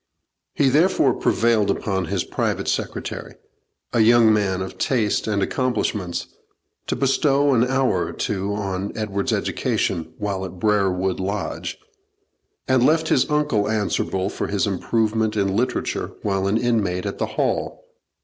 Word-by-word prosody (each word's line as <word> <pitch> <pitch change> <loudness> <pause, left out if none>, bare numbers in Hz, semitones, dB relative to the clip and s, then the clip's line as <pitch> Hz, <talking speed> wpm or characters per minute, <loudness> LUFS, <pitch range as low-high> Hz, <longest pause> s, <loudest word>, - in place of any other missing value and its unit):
He 140 - +3
therefore 150 -2 +3
prevailed 115 -3 +2
upon 95 -3 -1
his - - -1
private - - -2
secretary, - - -3 0.6
a - - +2
young 115 0 +6
man 95 -3 0
of 95 - -9
taste 110 -6 +1
and 100 -2 +1
accomplishments, 105 -9 -1 0.6
to - - 0
bestow 140 +1 +2
an 120 -2 +4
hour 130 -7 +1
or - - -5
two 100 -1 -2
on 95 -1 -3
Edward's 100 -2 -2
education 80 -1 -1
while 100 -2 -3
at 90 -1 -7
Brerewood 95 -3 +1
Lodge, 100 +2 -3 0.9
and 130 -2 +3
left 160 +3 +3
his 130 - +3
uncle 150 -9 +1
answerable 100 -2 -1
for - - -3
his 100 -1 0
improvement 110 +2 0
in 100 -1 +1
literature 125 +4 -1
while 95 -1 0
an 100 +3 +2
inmate 105 -7 0
at - - -4
the - - 0
Hall. - - -1
105 Hz, 140 wpm, -22 LUFS, 95-120 Hz, 0.9 s, young